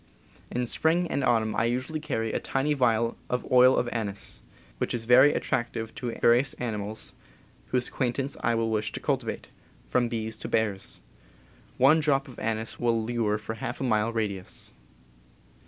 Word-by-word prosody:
In 125 0 -1
spring 165 +8 +2
and 140 - 0
autumn 110 -4 +2
I 110 - +2
usually 130 +6 -1
carry 115 -7 -2
a - - 0
tiny 135 +3 0
vial 115 -4 +1
of 125 - -1
oil 130 0 +7
of 125 - +1
anise, 105 -4 -4 0.4
which - - -1
is 115 -1 -4
very 130 +5 +7
attractive 115 -2 -2
to 120 -3 -5
various 125 +3 +4
animals 110 -3 -4 0.5
whose 125 -1 +1
acquaintance 135 +2 -2
I 120 - +2
wish 110 -2 0
to - - -4
cultivate - - -2 0.2
— - - -30
from 120 -1 +2
bees 110 -1 -3
to - - -5
bears. 100 -3 -1 0.8
One 140 +5 +6
drop 140 -3 +1
of 130 - -11
anise 110 0 -3
will 115 -1 +2
lure 115 -3 0
for 110 +1 -6
half 115 +2 -5
a - - -2
mile 110 -2 +1
radius. 105 -5 -2
120 Hz, 165 wpm, -27 LUFS, 110-130 Hz, 0.8 s, oil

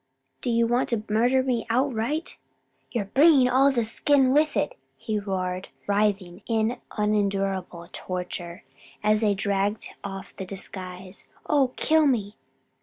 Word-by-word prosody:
do - - -2
you 230 0 +3
want 240 +2 +1
to 230 -3 -1
murder 245 +5 +3
me 250 -3 0
outright? 260 +4 0 0.5
you're 230 -5 -2
bringing 275 +4 +5
all 265 +3 +4
the 240 -3 +1
skin 265 +4 +2
with 305 +1 +2
it!" - - 0 0.2
he 215 -2 -2
roared, 185 -2 -3 0.2
writhing 200 -3 0
in 225 +1 0 0.2
unendurable 195 -4 -1
torture, 180 0 -5 0.4
as 215 +1 +3
they 210 -2 +2
dragged 200 +1 -1
off 195 -1 -7
the - - -4
disguise. 185 0 -6 0.2
"Oh 275 -4 +3
kill 315 -1 +3
me! 210 -6 0
215 Hz, 135 wpm, -25 LUFS, 195-255 Hz, 0.5 s, bringing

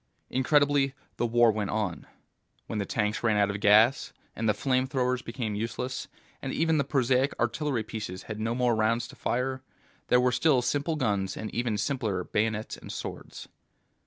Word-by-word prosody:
Incredibly, 140 0 +3 0.2
the 120 - +1
war 120 0 +5
went 105 -2 -2
on. 105 -6 -2 0.6
When 110 - -4
the 100 - -2
tanks 105 -1 -1
ran 110 -3 +2
out 100 0 +3
of 100 - -4
gas, 110 +5 +4 0.2
and 110 -1 0
the - - +4
flame 130 +3 +1
throwers 125 -2 0
became 115 -3 -4
useless, 115 +4 -3 0.3
and - - -3
even 160 -1 +2
the - - +3
prosaic 135 -1 +1
artillery 120 +1 0
pieces 105 -4 -6
had 110 -1 -6
no 115 +2 -1
more 125 -1 +2
rounds 115 +2 +1
to - - -12
fire, 130 +2 -1 0.5
there 125 - +5
were 125 0 +3
still 125 0 +3
simple 145 +5 0
guns 100 -8 -1
and 110 - -5
even 120 -3 -1
simpler 105 -5 -1
bayonets 110 +3 -1
and - - -9
swords. - - -7
120 Hz, 175 wpm, -28 LUFS, 110-130 Hz, 0.6 s, war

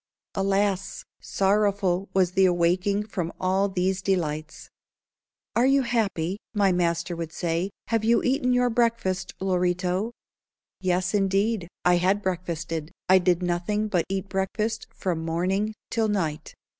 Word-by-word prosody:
Alas! 195 -1 0 0.2
sorrowful 195 -2 +1
was 185 -2 +2
the 190 +1 +4
awaking 180 +4 +1
from 180 -5 -3
all 190 +2 +1
these 190 0 0
delights. 155 -5 -2 0.8
"Are 245 +2 +4
you 275 0 +4
happy?" 200 -6 -1 0.2
my 200 -2 +4
master 175 0 0
would 165 -1 -5
say. 170 +3 -1 0.2
"Have 225 -1 +1
you 230 +1 +3
eaten 255 0 +1
your 245 0 +3
breakfast, 225 -6 0
Lorito?" 180 +2 0 0.7
Yes, 185 0 0
indeed, 195 0 +1 0.2
I 180 0 +5
had 190 +4 +1
breakfasted. 170 -3 -3 0.2
I 190 0 +7
did 180 -1 +2
nothing 180 +5 -1
but 180 -5 +1
eat 195 0 -2
breakfast 210 +3 -2
from 170 -4 -3
morning 190 +6 -1 0.2
till 225 -1 +1
night. 165 -7 -2
190 Hz, 130 wpm, -25 LUFS, 175-205 Hz, 0.8 s, I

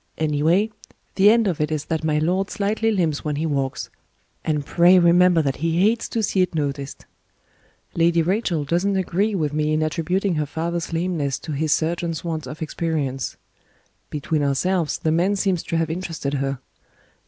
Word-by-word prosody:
Anyway, 160 +7 +2 0.4
the 200 +1 +5
end 230 +1 +4
of 170 -5 -1
it 150 0 0
is 155 -2 -2
that 160 0 -2
my 155 -1 +1
lord 180 +5 0
slightly 215 +2 0
limps 170 -9 0
when 150 -1 -2
he 155 +3 -1
walks; 140 -4 -2 0.5
and 150 -2 -1
pray 175 +4 +5
remember 175 -1 +5
that 135 -2 -1
he 165 +2 0
hates 225 +3 +1
to 225 - -1
see 195 -2 +1
it 180 -2 0
noticed. 140 -2 -3 0.9
Lady 170 0 +3
Rachel 180 -3 0
doesn't 175 +7 0
agree 195 +3 0
with 150 -5 -1
me 155 0 0
in 155 0 +1
attributing 180 +5 0
her 150 -1 -1
father's 170 +3 -3
lameness 165 -5 -1
to 155 - -8
his 150 +1 -1
surgeon's 165 0 -1
want 160 -5 -4
of 150 +4 -6
experience. 150 -5 -3 0.7
Between 150 +1 -2
ourselves, 155 +4 0
the 160 -3 -1
man 180 +5 +2
seems 190 -3 0
to 165 - -2
have 165 -1 0
interested 165 -5 -4
her. 135 -1 -1
165 Hz, 175 wpm, -22 LUFS, 150-180 Hz, 0.9 s, the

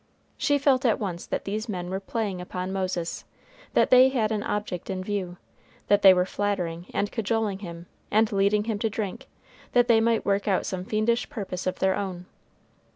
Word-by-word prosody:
She 290 -1 +2
felt 270 -2 +3
at 235 -4 +3
once 180 -5 -4
that - - -3
these 215 +3 -3
men 180 -3 -4
were 190 - -1
playing 200 -2 -3
upon 180 +1 -4
Moses; 185 -3 -2 0.5
that - - +4
they 255 +1 +8
had 230 -5 0
an 215 -1 0
object 205 -4 -3
in 185 -1 -3
view; 185 -3 -3 0.5
that 205 - +5
they 195 - +9
were 180 -1 +3
flattering 180 -4 -2
and 205 - -1
cajoling 220 -3 -1
him, 170 -3 -8 0.2
and 220 +1 +3
leading 200 +1 +2
him 215 -2 -2
to 225 - 0
drink, 205 -3 -5 0.5
that 245 -1 +4
they 225 -2 +5
might 230 0 +1
work 200 +1 +1
out 195 -2 +1
some 185 -1 -4
fiendish 220 +3 0
purpose 185 -4 -5
of 185 - -1
their 190 0 +2
own. 185 -3 -4
200 Hz, 190 wpm, -26 LUFS, 185-220 Hz, 0.5 s, they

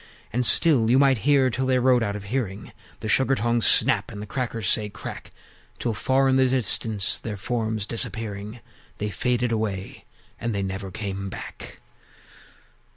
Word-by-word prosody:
And 125 +2 +1
still 135 -10 +5
you 125 - +4
might 135 -3 +4
hear, 135 -3 +4
till 130 +3 -2
they 130 -1 +2
rode 125 -1 +3
out 100 -2 -2
of 105 - -7
hearing, 105 -2 -4 0.3
The - - -4
Sugar 130 +5 +3
tongs 120 +1 +1
snap, - - +4
and 100 - -8
the 105 - -6
Crackers 115 -3 -3
say 105 +2 +1
"Crack!" 105 - -9 0.5
Till, 120 - -2
far 130 +5 +1
in 130 0 +3
the 130 0 +4
distance 110 -5 +1
their 105 -3 -6
forms 110 0 -2
disappearing, 110 0 -3 0.4
They 105 0 -3
faded 125 +2 -1
away; 105 -4 -4 0.3
and 115 -2 -3
they 100 - -1
never 95 0 -5
came 100 0 -5
back! - - -9
115 Hz, 165 wpm, -24 LUFS, 105-125 Hz, 0.5 s, still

